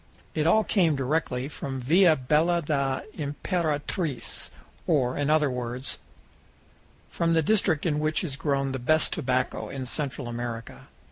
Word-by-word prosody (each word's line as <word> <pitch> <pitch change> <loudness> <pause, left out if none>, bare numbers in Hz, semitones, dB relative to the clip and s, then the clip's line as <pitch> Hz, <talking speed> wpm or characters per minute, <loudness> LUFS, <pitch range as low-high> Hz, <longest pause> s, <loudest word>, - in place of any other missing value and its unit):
It 155 0 +1
all 215 +6 +5
came 170 -9 +2
direct 140 +4 0 0.2
from 135 -2 -4
Villa 165 +6 +5
Bella 155 +6 +2
da 140 -3 0
Imperatriz 155 - -2 0.4
or, 130 -7 +2
in 145 0 0
other 150 -3 +3
words, 125 +1 -3 1.1
fro 170 - -1
the 165 -1 +3
district 180 -5 +2
in 150 -3 +1
which 155 +3 0
is 145 -6 -3
grown 140 -1 0
the 130 - -3
best 155 +6 +3
tobacco 130 -5 -1
in 135 -1 -5
Central 140 -1 -3
America. 120 -1 -6
145 Hz, 140 wpm, -27 LUFS, 130-160 Hz, 1.1 s, all